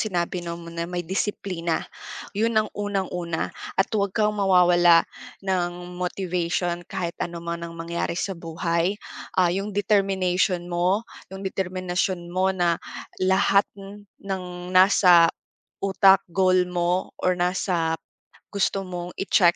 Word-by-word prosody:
sinabi 180 -3 -1
na 170 0 -5
mo 170 - -11
na, 170 0 -3
may 175 -1 -3
disiplina. 185 -3 -2 0.5
'Yon 225 +2 0
ang 215 0 +1
unang-una 185 -5 -2 0.3
at 195 - +3
huwag 200 -2 +1
kang 210 -1 +2
mawawala 175 -3 +5 0.4
ng 180 -1 -2
motivation 175 -1 -2
kahit 170 -2 -3
ano 170 0 -4
man 170 0 -4
ang 170 0 -7
mangyari 170 0 -3
sa 195 - -2
buhay. 170 +2 -1 0.4
Ah, 180 -1 +5
'yong 195 +3 -2
determination 190 -3 +1
mo, 180 +5 +1 0.3
'yong 190 +1 -8
determinasyon 185 -1 -2
mo 185 +2 +1
na 175 -3 +1 0.4
lahat 190 +1 +4
n 200 +1 -11 0.2
ng 180 -2 -5
nasa 185 -2 +7 0.5
utak, 195 0 +4
goal 185 0 +3
mo 180 +1 -1
or 185 0 +1
nasa 175 -2 0 0.6
gusto 195 -1 0
mong 175 0 -5
i-check 180 -3 +4
180 Hz, 130 wpm, -24 LUFS, 175-195 Hz, 0.6 s, nasa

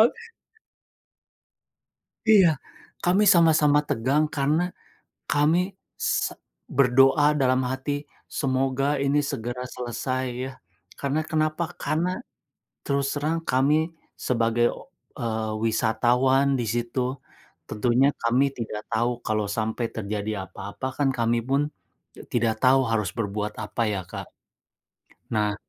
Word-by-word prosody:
Ok 460 - +2 2.0
Iya, 180 -9 +6 0.4
kami 185 +4 +4
sama-sama 155 -4 +5
tegang 135 +7 +2
karena 145 +4 +2 0.7
kami 150 +3 +3 0.4
se - - 0 0.4
berdoa 135 +3 +5
dalam 130 0 +3
hati, 145 +3 -3 0.3
"Semoga 135 0 +1
ini 140 +1 +2
segera 125 0 -4
selesai," 130 +2 -2 0.2
ya. 135 - -6 0.5
Karena 140 +3 0
kenapa? 155 +1 0 0.2
Karena 165 +4 0 0.8
terus 140 -1 +1
terang 160 +3 -1
kami 150 +5 +2 0.2
sebagai, 120 -1 +1 0.5
eee, 110 -2 -2
wisatawan 125 +5 +2
di 120 - 0
situ 125 +2 -2 0.5
tentunya 120 +5 +2
kami 120 +4 +3
tidak 110 -2 -5
tahu 115 +2 +1 0.2
kalau 110 -1 +1
sampai 110 +2 -1
terjadi 105 0 -3 0.2
apa-apa 100 +6 -7
kan 140 - +3
kami 115 0 +2
pun 135 +3 +1 0.7
tidak 115 -2 +1
tahu 130 +1 +6
harus 105 -5 0
berbuat 105 -1 -2
apa 110 +2 -4
ya, 95 -2 -2
Kak. - - -7 1.1
Nah 105 -2 +1
130 Hz, 105 wpm, -25 LUFS, 115-145 Hz, 2.0 s, Iya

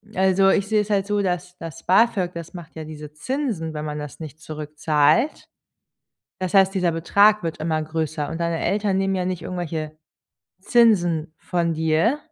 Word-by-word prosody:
also, 190 +1 +4
ich 200 0 +2
sehe 215 0 +2
es 210 - -6
halt 200 -1 +1
so, 205 -1 +1
dass 180 -1 -3
das 165 0 -9
BAföG, 190 -1 +3
das 170 +1 -8
macht 170 -2 -10
ja 160 - -6
diese 150 -1 -9
Zinsen, 215 - -3
wenn 150 0 -4
man 150 0 -4
das 150 +1 -8
nicht 155 -1 -9
zurückzahlt. 155 - 0 0.9
Das 185 0 -3
heißt, 195 0 +5
dieser 180 -3 +1
Betrag 200 +5 +3
wird 165 - -3
immer 155 0 -1
größer 155 -1 -3
und 165 - -5
deine 170 -1 -1
Eltern 200 -1 +1
nehmen 195 0 +1
ja 180 - -1
nicht 180 -2 -3
irgendwelche 160 -4 -4 0.6
Zinsen 175 -8 +3
von 170 -4 -1
dir. 160 - +2
170 Hz, 175 wpm, -23 LUFS, 155-195 Hz, 0.9 s, heißt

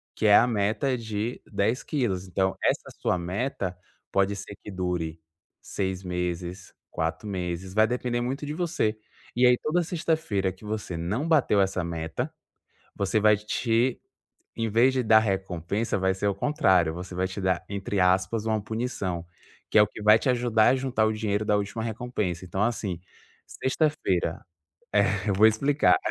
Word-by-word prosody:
Que - - -2
é 105 - +8
a 120 - +6
meta 115 +4 0
de 110 +1 -4
10 110 +5 0
quilos. 100 - -1
Então, 95 +1 0
essa - - +1
sua 90 - +1
meta 95 +1 -3 0.3
pode 100 +1 +2
ser 100 +1 -8
que - - -10
dure 90 -4 -3 0.4
6 95 -1 -3
meses, 90 0 -4 0.2
4 80 +6 -2
meses. 90 -1 -4
Vai 110 +1 +4
depender 125 -1 -1
muito 135 +4 -3
de 150 - -4
você 160 -11 -1 0.4
E 125 - +4
aí, 125 0 +6
toda 165 +6 0
sexta-feira 155 - -1
que 95 +4 -15
você 105 -5 -4
não 105 - -2
bateu 140 -11 +4
essa 95 -2 0
meta, 80 -1 -4 0.6
você 100 +2 +1
vai 105 0 +5
te 115 +3 0 0.6
em 115 -1 -1
vez 120 +5 +4
de 130 -1 +1
dar 110 0 +7
recompensa, 95 +1 -1
vai 95 0 +2
ser 100 +2 -2
o 100 - +2
contrário. 95 - +2
Você 90 +1 -7
vai 95 +1 0
te 95 +1 -6
dar 95 -1 0
entre 100 0 -2
aspas, 95 +4 +2
uma 110 -1 +1
punição. 105 -6 -3 0.5
Que - - +5
é - - +9
o - - +4
que 105 - -10
vai 105 +1 +7
te 130 - -2
ajudar 120 -3 +3
a - - +4
juntar 130 -4 0
o 110 - +2
dinheiro 110 -1 -1
da 105 -1 +2
última 105 +3 -3
recompensa. 110 -6 -3
Então, 95 +3 -2
assim, 105 -6 -2 0.5
sexta-feira 130 - 0 0.7
é 100 +2 -1
eu - - +3
vou 105 +3 +6
explicar. 140 - +3
105 Hz, 170 wpm, -26 LUFS, 95-120 Hz, 0.7 s, é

